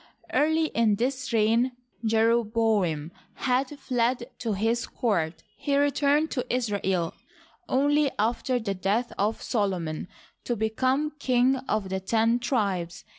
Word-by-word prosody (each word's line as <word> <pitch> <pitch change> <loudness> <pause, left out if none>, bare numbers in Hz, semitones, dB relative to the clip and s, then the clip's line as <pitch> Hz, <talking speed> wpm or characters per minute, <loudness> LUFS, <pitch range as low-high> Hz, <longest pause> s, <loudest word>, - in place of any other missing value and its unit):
Early 315 +2 +3
in 225 -3 +2
this 255 +4 -2
reign 230 +3 +3 0.3
Jeroboam 220 -7 +2 0.2
had 260 +2 0
fled 245 -1 -1
to 225 -3 -1
his 225 +4 0
court. 165 - -1
He 280 -1 0
returned 290 +2 +2
to 250 - -2
Israel 200 -8 0 0.6
only 290 +2 +3
after 240 +4 0
the 220 -4 -2
death 200 +6 -1
of 210 +3 0
Solomon, 180 -8 -1 0.4
to 240 - -1
be 220 0 0
come 265 +6 +1
king 255 0 +3
of 210 -3 0
the 190 0 -1
ten 225 +4 +2
tribes. 200 -8 -1
230 Hz, 125 wpm, -27 LUFS, 205-255 Hz, 0.6 s, Early